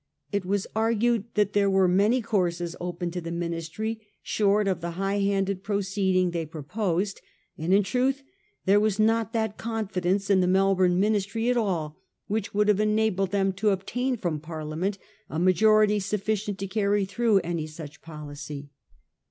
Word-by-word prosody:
It 200 -3 -1
was 195 +1 0
argued 225 0 +2
that 205 -1 +2
there 200 -1 +3
were 190 -1 +4
many 210 +7 +3
courses 175 -5 -1
open 175 0 -3
to 180 +1 -4
the 165 - -6
Ministry 170 +6 -3 0.2
short 205 0 +2
of 185 -3 0
the 170 0 -5
high 195 +1 0
handed 195 -1 0
proceeding 195 -2 0
they 170 -1 -2
proposed; 180 +5 -2 0.3
and 160 +3 -2
in 200 +2 +5
truth 260 +7 0 0.4
there 200 +1 +5
was 210 -2 +1
not 225 0 +2
that 220 -2 -1
confidence 200 -3 -1
in 190 -1 +5
the 180 - +2
Melbourne 185 -1 +3
Ministry 215 +3 +1
at - - +1
all 170 -9 -1 0.3
which 210 -1 -2
would 210 0 +2
have 210 -1 +3
enabled 215 -3 +1
them 195 0 +1
to 205 +3 +1
obtain 245 +7 -1
from 170 -7 -2
Parliament 160 +5 -4 0.3
a 155 - -4
majority 210 +4 +4
sufficient 205 0 -2
to 195 - -4
carry 200 0 +1
through 220 +1 +2 0.3
such 155 -1 -9
a - - -39
policy. 145 -2 -8
195 Hz, 160 wpm, -26 LUFS, 180-215 Hz, 0.4 s, in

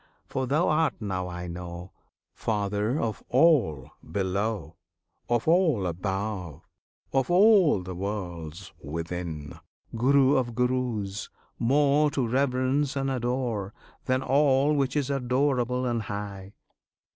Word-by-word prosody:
For 130 -1 -3
Thou 150 +7 +2
art, 155 0 +2
now 95 -4 -3
I 90 0 -6
know, 85 +1 -7 0.4
Father 105 +4 -1
of 110 -2 -2
all 125 - +3
below, 100 +1 -2 0.5
Of 120 +2 +1
all 160 - +3
above, 95 -1 -4 0.5
of 135 -1 +1
all 180 - +5
the 90 +1 -6
worlds 90 -4 -5
within 80 0 -5 0.4
Guru 135 +3 +4
of 120 -3 -1
Gurus; 125 -5 -1 0.3
more 145 +4 +3
To 135 -5 -1
reverence 130 +2 +1
and 135 -1 -1
adore 120 -5 -2 0.3
Than 130 0 +1
all 140 +1 +3
which 135 -2 0
is 145 -2 0
adorable 125 -1 0
and 120 -2 0
high! 100 -2 -6
120 Hz, 115 wpm, -27 LUFS, 95-135 Hz, 0.5 s, all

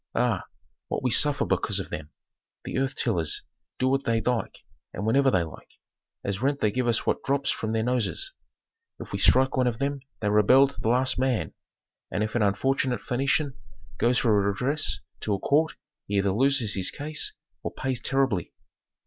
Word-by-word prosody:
Ah, 120 -5 +1 0.4
what - - -3
we 125 - +1
suffer 145 +5 +4
because - - +1
of - - -6
them. 75 -1 -5 0.6
The - - -2
earth 135 0 -1
tillers 85 -10 0 0.3
do 130 - +1
what 135 +1 +1
they 115 -2 +1
like 125 0 -2 0.3
and 100 - -3
whenever 135 +5 +4
they 95 -7 +2
like. 80 - -11 0.5
As 100 +1 -3
rent 140 +2 +1
they 105 - +2
give 125 +1 -1
us 115 -1 +1
what - - 0
drops 140 0 +1
from 110 - -3
their 110 0 0
noses. 125 - -1 0.7
If - - -9
we - - -2
strike 130 +1 +4
one 130 -1 +2
of 115 -2 -1
them 140 +2 -1 0.2
they 105 - 0
rebel 105 +7 +6
to 140 - -9
the 110 - 0
last 125 +2 +2
man, 130 -3 0 0.6
and 105 - -1
if 110 - -3
an 120 - +1
unfortunate 125 +5 +1
Phœnician 140 +3 0 0.5
goes 120 +2 +3
for 120 -5 +3
redress 125 +10 0 0.2
to 105 - -1
a - - -5
court 155 +7 +2 0.3
he 100 - -2
either 100 0 +2
loses 125 0 +2
his 95 -2 +1
case 150 +1 -3 0.3
or - - -4
pays 130 -2 -3
terribly. 135 -9 0
125 Hz, 185 wpm, -26 LUFS, 105-135 Hz, 0.7 s, rebel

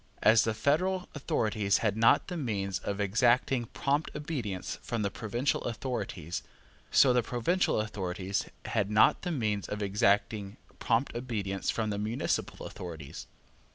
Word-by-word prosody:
As 110 +1 +6
the 110 -1 0
federal 180 - +1
authorities 110 -7 +1
had 105 -2 +2
not 115 +1 +4
the 180 - -4
means 100 - -2
of 100 +1 -4
exacting 120 +4 +2
prompt 145 +6 0
obedience 135 - -4
from 115 -3 -2
the 100 - -1
provincial 120 +6 -1
authorities, 105 - -3 0.5
so 130 -3 +6
the 125 - +4
provincial 120 - +1
authorities 100 -2 -2 0.2
had 105 -3 0
not 105 0 +5
the 180 - -3
means 110 - -1
of 105 0 -3
exacting 100 +1 +1 0.2
prompt 120 +3 +1
obedience 105 -6 -3
from 110 -2 0
the 100 - -2
municipal 110 +3 -2
authorities. 80 -5 -8
110 Hz, 140 wpm, -30 LUFS, 100-125 Hz, 0.5 s, As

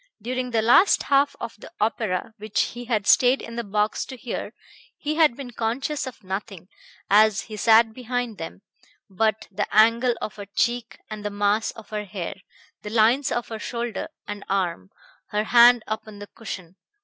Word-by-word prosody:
During 250 +3 -3
the 225 -2 +1
last 245 - +5
half 280 0 +2
of 235 - -6
the - - -12
opera, 215 -2 -1
which 215 0 -1
he 245 +1 -7
had 220 -4 0
stayed 255 +4 +5
in 230 - -8
the 235 - -2
box 210 +1 0
to 260 - -9
hear, 240 - -5 0.5
he 300 0 -2
had 310 -6 +3
been 265 -3 -7
conscious 260 +5 -2
of 250 -4 -10
nothing, 190 -1 -6 0.4
as 210 0 +5
he 215 - -9
sat 225 +1 +5
behind 245 -2 -3
them, 165 +4 -8 0.5
but 220 +2 0
the 205 +2 -2
angle 230 +3 +4
of 215 - -6
her 200 -1 -8
cheek 235 +3 -1
and 215 -1 -6
the 205 - -2
mass 205 +2 +1
of 225 -2 -11
her 210 -1 -3
hair, 190 -3 -5 0.5
the 210 - -6
lines 235 +6 +3
of 240 - -2
her 225 -1 -5
shoulder 235 0 -4 0.2
and 205 -1 -6
arm, 175 - -1 0.4
her 210 0 -1
hand 240 +1 +6
upon 215 -1 -5
the 205 - -8
cushion. 190 -5 -9
220 Hz, 180 wpm, -24 LUFS, 205-240 Hz, 0.5 s, hand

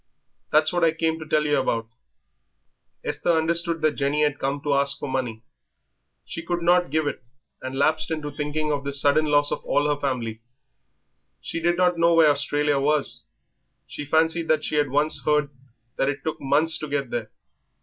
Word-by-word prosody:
That's 155 +2 +3
what 175 -1 0
I 165 -1 +4
came 160 0 -1
to 155 - -9
tell 150 0 +1
yer 145 -1 +2
about." 115 -3 -1 1.2
Esther 170 -2 0
understood 165 +1 +1
that 155 0 +3
Jenny 145 +2 +1
had 145 -1 0
come 140 +1 -2
to 145 - 0
ask 140 0 +1
for - - -6
money. 125 -4 -3 0.8
She 165 - -6
could 170 0 -3
not 175 +1 +3
give 155 0 0
it, 145 - -4 0.4
and 130 +1 -5
lapsed 155 +4 +1
into 155 -2 -4
thinking 150 +1 -2
of 145 -1 -2
this 140 0 +2
sudden 145 +3 +3
loss 145 -1 +2
of - - -3
all 145 - +1
her 145 -1 -1
family. 115 -5 -3 1.0
She - - -4
did 175 +1 +1
not 180 -1 +2
know 170 0 +4
where 160 -2 +6
Australia 145 0 0
was; 150 +1 +1 0.6
she - - -7
fancied 160 +2 +1
that 155 -1 +2
she - - -4
had 145 -2 +2
once 145 +3 +1
heard 150 -1 +1 0.5
that 135 - +1
it 140 - -4
took 160 - -4
months 155 +4 +2
to 155 - -5
get 140 -3 -2
there. 115 -2 -3
150 Hz, 190 wpm, -24 LUFS, 140-160 Hz, 1.2 s, where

